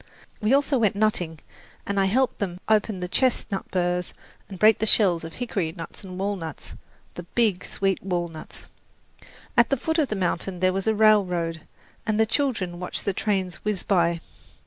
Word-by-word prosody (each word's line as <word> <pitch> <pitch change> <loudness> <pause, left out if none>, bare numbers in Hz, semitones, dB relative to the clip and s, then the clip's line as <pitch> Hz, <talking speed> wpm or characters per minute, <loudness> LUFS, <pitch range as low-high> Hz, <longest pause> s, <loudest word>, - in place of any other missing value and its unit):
We 215 +2 +1
also 280 -1 +3
went 210 -3 +2
nutting, 180 -7 0 0.4
and 200 0 -1
I 195 - +3
helped 255 +7 +1
them 180 -3 -3
open 215 -3 +2
the 180 - -2
chestnut 220 -2 0
burrs 180 -1 -1 0.3
and 195 - -8
break 215 +2 +5
the 220 - 0
shells 185 -7 +4
of 165 0 -7
hickory 195 -10 -2
nuts 165 +4 -9
and 185 -1 -8
walnuts 190 -6 -4 0.4
the - - -7
big, 190 +1 0
sweet 195 -1 -1
walnuts! 175 -4 -5 0.9
At 235 - +5
the 275 - +2
foot 320 +6 -1
of 300 - +2
the 215 - -3
mountain 180 -1 -2
there 185 0 +2
was 195 +2 -2
a 220 - +3
railroad, 180 -7 +3 0.5
and 215 0 +1
the 220 - +5
children 215 -9 -1
watched 180 - -5
the 200 - 0
trains 190 -3 -1
whiz 210 -3 -3
by. 170 -4 +2
195 Hz, 175 wpm, -25 LUFS, 175-215 Hz, 0.9 s, break